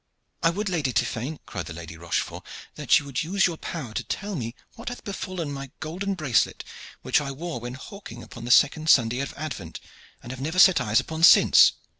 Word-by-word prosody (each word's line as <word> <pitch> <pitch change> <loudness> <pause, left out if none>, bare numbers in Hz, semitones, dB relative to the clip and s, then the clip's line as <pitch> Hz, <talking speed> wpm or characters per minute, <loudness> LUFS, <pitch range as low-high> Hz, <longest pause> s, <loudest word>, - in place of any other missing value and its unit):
"I 165 - +4
would, 205 +5 -3
Lady 160 -8 0
Tiphaine," 130 +9 -1
cried - - -6
the 85 - -7
Lady 80 -1 -9
Rochefort, 85 +1 -3 0.3
"that - - +3
you 145 - -3
would 140 -3 -2
use 195 +5 +1
your 170 -3 -1
power 145 -11 -6
to - - -2
tell 205 -1 -4
me 115 -4 -5 0.2
what 230 - -7
hath 245 - -8
befallen 185 -6 -5
my 140 -1 -6
golden 190 +5 -3
bracelet 140 -9 +1 0.4
which - - +2
I 140 - -4
wore 155 0 -5
when 120 +2 -6
hawking 135 - -10
upon 115 - -11
the - - -5
second 155 +5 +4
Sunday 120 -2 +4
of 140 - -4
Advent, 105 - -6 0.4
and 120 - -8
have 130 0 -7
never 160 +6 -3
set 185 0 +7
eyes 110 +2 +2
upon 160 0 -5
since." 170 - +7
145 Hz, 205 wpm, -25 LUFS, 120-175 Hz, 0.4 s, set